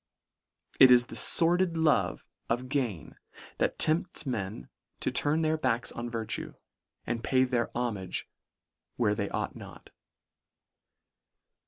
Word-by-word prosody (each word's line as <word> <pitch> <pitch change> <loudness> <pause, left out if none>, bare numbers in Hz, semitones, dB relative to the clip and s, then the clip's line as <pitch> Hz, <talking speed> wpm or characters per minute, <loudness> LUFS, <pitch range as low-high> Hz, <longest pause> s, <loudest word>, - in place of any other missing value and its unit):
It 130 - +9
is 120 -1 +6
the - - -10
fordid 175 0 +4
love 160 -2 +1 0.2
of 125 +2 -2
gain 125 - -3 0.4
that - - 0
tempts 165 +1 0
men 100 - -4 0.3
to - - -1
turn 155 +3 +2
their 155 0 +1
backs 125 -5 0
on 120 0 -5
virtue, 115 -2 -4 0.5
and 115 0 -3
pay 130 -1 +3
their 125 -2 0
homage 105 -7 -3 0.7
where 110 -4 +1
they 100 -1 -3
ought - - -3
not. - - -12
125 Hz, 125 wpm, -29 LUFS, 115-155 Hz, 0.7 s, It